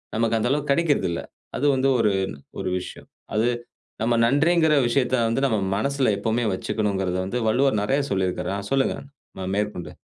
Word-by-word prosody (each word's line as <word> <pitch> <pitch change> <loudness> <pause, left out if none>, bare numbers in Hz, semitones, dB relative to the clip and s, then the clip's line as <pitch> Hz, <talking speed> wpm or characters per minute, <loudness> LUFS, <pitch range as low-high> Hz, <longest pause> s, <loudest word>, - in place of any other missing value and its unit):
நமக்கு 115 0 +1
அந்த 120 - 0
அளவுக்கு 145 0 0
கிடைக்கறதில்ல. 145 - +1 0.4
அது 140 - -1
வந்து 135 +1 +2
ஒரு 105 - +3 0.5
ஒரு - - -2
விஷயம். 90 - -10 0.3
அது 110 +3 +2 0.5
நம்ம 120 +1 +2
நன்றிங்கற 160 +5 +3
விஷயத்தை 125 +1 +1
வந்து 125 +4 0
நம்ம 110 -5 0 0.2
மனசுல 135 0 +1
எப்பவுமே 115 +3 0
வச்சுக்கணுங்கறது 95 -2 -1
வந்து 100 +6 -3
வள்ளுவர் 130 -1 +2
நெறைய 135 +7 +1
சொல்லியிருக்காரா. 95 0 -1
ஆ - - -10
சொல்லுங்க 135 -1 +2 0.5
அ - - -3
மேற்கொண்டு. 105 -4 -3
115 Hz, 155 wpm, -24 LUFS, 105-140 Hz, 0.5 s, ஒரு